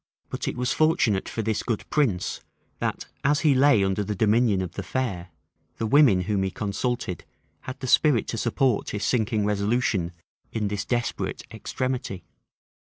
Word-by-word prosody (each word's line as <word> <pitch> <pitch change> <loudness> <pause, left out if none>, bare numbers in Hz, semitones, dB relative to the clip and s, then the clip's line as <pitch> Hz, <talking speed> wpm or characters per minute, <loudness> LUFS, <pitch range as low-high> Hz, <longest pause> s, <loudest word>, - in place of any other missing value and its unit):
But - - -4
it - - -3
was 125 0 0
fortunate 155 - +2
for 115 - -3
this 110 0 0
good 115 -4 -3
prince 120 -12 0 0.4
that, - - -2 0.2
as 145 +2 +2
he 150 -4 +4
lay 130 -6 +5
under 95 +1 0
the 105 +1 -3
dominion 110 -1 +3
of 90 - -5
the - - -5
fair, 95 -9 -3 0.5
the 115 - -2
women 120 -6 +5
whom 100 +1 0
he 95 - 0
consulted 105 -1 -3 0.5
had 130 +1 -7
the - - -3
spirit 130 -2 +4
to 115 - -2
support 120 0 +1
his 105 -1 -3
sinking 110 -3 +1
resolution 100 -3 0 0.4
in 105 -2 -1
this 100 0 -3
desperate 120 0 -2
extremity. 130 -8 -3
110 Hz, 160 wpm, -25 LUFS, 100-130 Hz, 0.5 s, lay